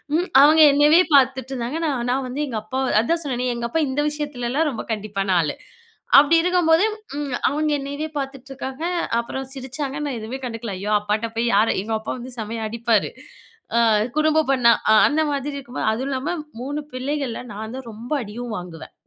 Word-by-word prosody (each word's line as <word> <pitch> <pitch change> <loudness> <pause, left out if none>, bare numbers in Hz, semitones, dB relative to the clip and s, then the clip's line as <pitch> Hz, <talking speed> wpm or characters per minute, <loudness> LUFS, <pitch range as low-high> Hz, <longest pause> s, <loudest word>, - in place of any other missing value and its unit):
ம் 350 +3 0
அவங்க 310 +3 +7
என்னையவே 295 +4 +6
பாத்துட்ருந்தாங்க, 260 0 +1
நான், 250 -5 -2
நான் 265 +1 -1
வந்து 260 +3 -5
எங்க 235 -5 -4
அப்பா 260 +5 -4 0.2
அதான் 335 +9 0
சொன்னேனே, 250 -3 -1
எங்க 235 0 -3
அப்பா 325 +7 0
இந்த 270 +3 0
விஷயத்துலலாம் 295 0 -2
ரொம்ப 230 - -5
கண்டிப்பான 200 -2 -3
ஆளு. 150 -3 -2 0.6
அப்டி 295 +4 +4
இருக்கும்போது 350 0 +3 0.3
ம் 285 -4 -3
அவங்க 305 +1 0
என்னையவே 285 +3 -4
பாத்துட்டு 270 -1 -6
இருக்காங்க. 270 +1 -6 0.4
அப்றம் 265 +3 -4
சிரிச்சாங்க. 270 +1 -5
நான் 280 -3 -3
எதுவுமே 220 +4 -5
கண்டுக்கல, 230 -3 -5
ஐயோ! 205 +2 -4
அப்பாட்ட 210 +2 -1
போய் 230 +1 0
யாரை 215 +3 +4
எங்க 220 +3 -4
அப்பா 215 - -5
வந்து 250 +1 -8
செமையா 220 +1 -4
அடிப்பாரு, 230 -1 +1 0.7
அ - - +5 0.4
குரும்பு 310 0 +3
பண்ணா. 245 -3 +5 0.2
அ - - +7
அந்த 305 +2 +1
மாதிரி 285 0 -3
இருக்கும்போது, 260 -4 -5
அதும் 260 +5 -3
இல்லாம, 275 +6 -2 0.3
3 290 +4 -3
பிள்ளைகள்ல 260 -1 -3
நான் 220 +3 -6
தான் 260 -3 -8
ரொம்ப 230 +4 -10
அடியும் 230 +2 -6
வாங்குவேன். 175 -3 -9
260 Hz, 175 wpm, -22 LUFS, 230-290 Hz, 0.7 s, அவங்க